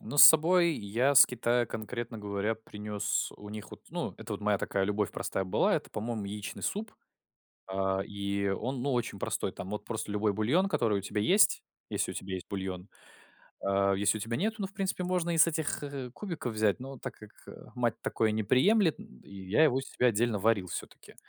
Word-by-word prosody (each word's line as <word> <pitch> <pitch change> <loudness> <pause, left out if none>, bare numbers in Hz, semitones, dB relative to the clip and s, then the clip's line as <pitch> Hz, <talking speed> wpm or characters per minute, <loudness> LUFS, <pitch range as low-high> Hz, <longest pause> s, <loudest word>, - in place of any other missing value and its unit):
Но 145 - -7
с - - +10
собой 170 +2 +8
я 120 +7 +1
с 140 - +10
Китая, 120 0 0
конкретно 115 +1 -5
говоря, 105 +1 -2
принёс 105 -2 -3
у 105 - -11
них 105 0 -8
вот - - -11
ну, 175 0 -4
это 110 0 -7
вот 105 - -4
моя 105 -1 +2
такая 95 -1 -1
любовь 105 -1 0
простая 95 - -3
была- 95 - +2
это, - - -3
по-моему, 110 -1 -4
яичный 105 +1 -6
суп. 210 +2 -3 0.8
А, 95 0 0
и 100 0 -2
он, 120 +6 -2
ну, 140 0 0
очень 120 -2 -2
простой. - - -2
Там 95 - -8
вот 105 0 -4
просто 110 -2 -4
любой 105 0 +1
бульон, 135 - +2
который 110 - +1
у - - -6
тебя 105 +2 -2
есть, 195 - +4 0.3
если - - -1
у - - -7
тебя 95 0 -6
есть 90 - -8
бульон, 95 -1 -4 0.8
а 100 0 +2
если 100 +2 +2
у - - -9
тебя 115 +3 -2
нету, 215 +4 0
ну, 195 - -2
в 195 - -14
принципе, 190 -3 -2
можно 180 -1 0
и - - -1
с 160 - +8
этих, 160 -3 -2
э, 140 -3 -5
кубиков 165 - -5
взять, 110 0 +1
но 135 0 -8
так - - -6
как, 105 -1 -13 0.2
э, - - -9 0.2
мать 120 -2 +1
такое 110 -1 +1
не 110 0 0
приемлет, 165 - +3
м, 65 - -14
и 100 - -13 0.2
я 155 +10 +5
его 135 -3 +3
себе 125 -1 0
отдельно 115 -1 +2
варил 105 -2 +2
все-таки. - - -8
110 Hz, 210 wpm, -30 LUFS, 100-140 Hz, 0.8 s, с